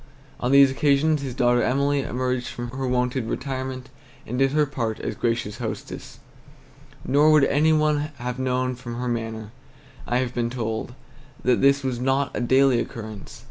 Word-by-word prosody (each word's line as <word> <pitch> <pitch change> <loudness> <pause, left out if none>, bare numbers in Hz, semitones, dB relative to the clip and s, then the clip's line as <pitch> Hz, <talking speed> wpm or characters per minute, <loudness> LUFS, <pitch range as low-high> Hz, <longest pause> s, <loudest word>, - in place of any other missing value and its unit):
On 125 - -1
these 140 -1 +7
occasions 145 +2 +2
his 130 -3 -5
daughter 120 -1 +3
Emily 140 +2 +1
emerged 125 -1 -2
from 120 0 -6
her 130 +1 -3
wonted 125 -1 0
retirement 130 -1 -4 0.4
and 125 +3 -4
did 135 0 +4
her 150 +1 +3
part 120 -6 -3
as - - -3
gracious 115 -3 -2
hostess; - - -6 0.9
nor 145 +3 +4
would 155 -2 +6
any 150 +3 +3
one 150 -1 +2
have 125 +1 -4
known 130 0 0
from 120 -1 -7
her 125 +1 -3
manner, 115 -2 -4 0.6
I 120 - +1
have 125 -1 -1
been 120 -1 -1
told, 115 0 -4 0.5
that 125 -1 +2
this 140 0 +4
was 130 -2 -2
not 135 +2 +1
a - - -2
daily 130 0 +4
occurrence. 110 -4 -7
130 Hz, 170 wpm, -24 LUFS, 120-140 Hz, 0.9 s, these